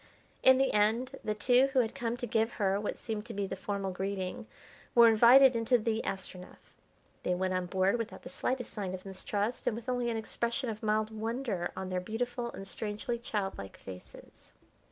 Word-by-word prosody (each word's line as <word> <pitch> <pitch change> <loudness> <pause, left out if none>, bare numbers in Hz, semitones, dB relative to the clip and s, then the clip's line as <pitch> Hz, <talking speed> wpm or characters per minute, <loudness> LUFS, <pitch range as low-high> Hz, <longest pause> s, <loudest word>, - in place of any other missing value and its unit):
In 260 0 +7
the 270 0 +2
end 220 +5 +2
the 215 - -1
two 250 +4 +4
who 265 - +4
had 225 - -2
come 235 0 -2
to 245 - -3
give 225 0 +1
her 195 -1 +1
what 210 - -3
seemed 220 -2 -4
to - - -6
be 200 0 -1
the - - -4
formal 195 0 -3
greeting, 195 +4 -4 0.5
were 235 -1 +9
invited 245 +4 +7
into 230 +2 +3
the 225 0 -1
Astronef. 185 -1 -6 0.5
They 180 - 0
went 185 +1 -1
on 185 -1 -1
board 190 +5 +2
without 230 0 -5
the 260 - -8
slightest 260 -2 -3
sign 190 -3 -3
of 185 - -11
mistrust 200 +4 -3
and 220 - +2
with 230 +2 -8
only 245 -1 0
an 230 - -1
expression 235 +3 -2
of 215 - -8
mild 215 0 +1
wonder 220 -4 -2
on 190 -1 -4
their 185 -1 -1
beautiful 235 +4 -3
and 195 - -8
strangely 215 +4 -3
childlike 195 - -4
faces. 90 -1 -12
220 Hz, 195 wpm, -31 LUFS, 195-240 Hz, 0.5 s, were